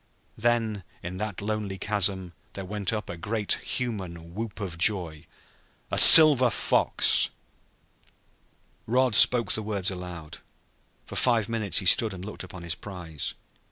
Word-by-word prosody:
Then, 115 -3 -3 0.2
in 90 +1 -8
that 105 -1 -7
lonely 105 -2 -5
chasm, 95 -3 -3 0.2
there 95 - -9
went 100 0 -4
up 110 -1 -6
a 85 - -8
great 105 +4 -6
human 90 -9 -6
whoop 110 +1 -8
of 90 -5 -8
joy. 85 -6 -1 0.6
"A - - -1
silver 145 -6 +9
fox!" - - +2 1.6
Rod 125 +1 -1
spoke 120 +2 +2
the 110 - -3
words 100 -2 -3
aloud. 90 -4 -11 0.7
For - - -12
five 115 -4 0
minutes 110 -4 -1
he - - +1
stood 105 +2 +3
and 90 +1 -11
looked 105 - -9
upon 95 -4 -12
his 85 -1 -5
prize. 90 -6 -7
100 Hz, 140 wpm, -24 LUFS, 90-110 Hz, 1.6 s, silver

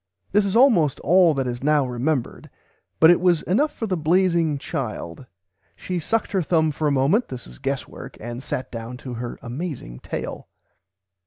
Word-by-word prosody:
This 205 -1 +3
is 195 - -2
almost 225 - +4
all 175 0 +5
that 135 -1 -1
is 120 -1 -4
now 150 -1 +3
remembered, 125 +2 -2 0.5
but 160 +1 +8
it 175 - +3
was 175 -3 +3
enough 280 - +1
for 230 - -5
the 195 -4 -1
blazing 170 -1 +2
child. 125 - -5 0.5
She 180 -1 -3
sucked 225 +8 -1
her 190 - +1
thumb 160 -1 +2
for 150 +1 -1
a - - +2
moment 140 - +2
(this 125 -2 -7
is - - -14
guesswork), - - -5
and 120 +2 -6
sat 130 - -4
down 115 +1 -6
to 125 -1 -7
her 120 0 -5
amazing 120 - -6
tale. - - -6
150 Hz, 175 wpm, -23 LUFS, 125-180 Hz, 0.5 s, but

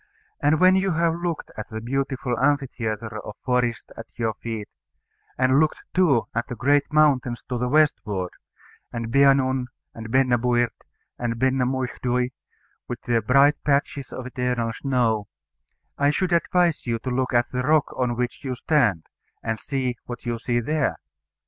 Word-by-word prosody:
And 150 +2 +3
when 185 +1 +6
you 190 -1 +1
have 165 0 +2
looked 170 -1 -4
at 110 - -7
the 110 -1 -5
beautiful 130 +1 -2
amphitheatre 115 -6 -1
of 105 - -8
forest 125 -2 0
at 115 - -9
your 115 -2 -1
feet, 110 -1 -6 0.7
and 130 +1 +4
looked 155 0 +1
too 160 -11 +3
at 115 +1 -1
the 125 - -5
great 140 +5 +2
mountains 140 -6 +2
to 125 -2 -2
the 125 - 0
westward, 105 - +1 0.6
and 115 -1 -4
Benaun, 135 -1 +4 0.3
and 115 0 -8
Benna 125 -1 +3
buird 120 -1 +2 0.5
and 120 -1 -1
Benna 130 0 +2
muicdhui, 125 -1 -1 0.6
with 120 - -5
their 115 -1 +1
bright 140 +4 +4
patches 140 -1 0
of 130 - -6
eternal 125 -2 -1
snow, 115 -6 0 0.7
I 140 0 +4
should 180 +4 0
advise 170 -3 +2
you 115 -1 0
to 125 +3 -5
look 130 +1 0
at 120 0 +2
the 125 - -1
rock 150 +2 +2
on 125 -2 0
which 120 +3 -3
you 130 -2 -3
stand, 115 - +1 0.4
and 110 -1 -2
see 130 0 -2
what 120 0 -8
you 120 -1 -2
see 120 0 0
there. 150 +3 0
125 Hz, 160 wpm, -24 LUFS, 120-140 Hz, 0.7 s, when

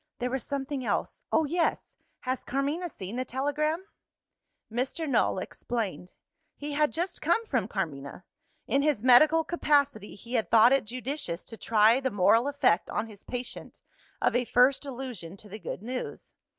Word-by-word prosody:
There 250 0 -2
was 265 -1 -2
something 275 -1 -3
else. - - -2
Oh, 315 - +3
yes! 330 +3 -1 0.3
Has 255 0 -2
Carmina 290 +7 -1
seen 195 - -7
the 255 - 0
telegram?" 300 +7 -1 0.9
Mr. 265 +7 -2
Null 245 -7 +2
explained. 185 -4 -4 0.4
He 295 +1 -5
had 300 +1 +2
just 350 +3 -3
come 455 0 +2
from 255 - 0
Carmina. 160 -4 -5 0.4
In 275 +4 +2
his 290 -7 +1
medical 310 +6 +6
capacity, 285 - +1
he 235 +4 -11
had 230 -3 0
thought 230 +3 +7
it 275 - +2
judicious 250 - -4
to 225 - -8
try 225 +2 +4
the 265 -1 -1
moral 225 +4 +4
effect 285 -11 +2
on 210 - -1
his 210 -3 -13
patient 245 0 -6 0.4
of - - +1
a 245 - +3
first 250 +4 +3
allusion 240 -10 -6
to 210 - -14
the 210 +2 -8
good 200 - -6
news. 250 +2 -6
255 Hz, 165 wpm, -28 LUFS, 220-285 Hz, 0.9 s, thought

